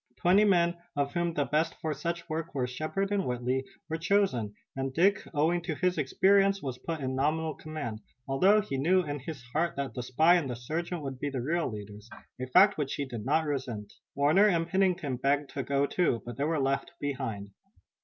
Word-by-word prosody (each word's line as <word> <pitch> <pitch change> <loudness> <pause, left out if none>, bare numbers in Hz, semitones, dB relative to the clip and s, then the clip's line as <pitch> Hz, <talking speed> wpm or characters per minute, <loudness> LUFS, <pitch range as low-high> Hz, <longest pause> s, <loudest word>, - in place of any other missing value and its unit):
Twenty 190 +8 +4
men, 175 -3 +3 0.2
of 140 0 -1
whom 170 -1 -1
the 145 - +1
best 155 +3 0
for 155 -1 -2
such 170 +4 -4
work 160 -1 -4
were 130 -2 +1
Shepard 155 +10 -3
and 200 -1 +1
Whitley, 125 0 -1 0.2
were 160 - -2
chosen, 165 - +1 0.2
and 135 0 -2
Dick, 190 +8 +3
owing 165 +3 +1
to 170 -2 -3
his 180 +1 0
experience, 195 +7 +3
was 130 -6 -5
put 165 +1 -4
in 130 -1 -2
nominal 155 +3 0
command, 150 -9 -6 0.3
although 190 +11 +4
he 165 -10 -4
knew 180 +6 +3
in 145 -2 -4
his 135 -1 -7
heart 170 +3 0
that 140 -1 -3
the 125 - -4
spy 155 +8 +4
and 150 -6 -2
the 125 - -3
sergeant 160 +7 -4
would 135 -2 -5
be 145 - -2
the 130 -3 -3
real 165 +3 0
leaders, 105 +1 -9 0.3
a 130 - -3
fact 190 +7 +5
which 140 -2 -1
he 140 - -2
did 120 -5 -7
not 160 0 +2
resent. 125 -8 -4 0.2
Warner 155 +9 +5
and 165 -4 +1
Pennington 180 -7 +1
begged 140 +2 0
to 140 - -3
go 140 +1 +1
too, 140 -7 0
but 120 -1 -6
they 140 - -1
were 160 0 0
left 135 0 -1
behind. 115 -8 -4
150 Hz, 205 wpm, -29 LUFS, 130-170 Hz, 0.3 s, fact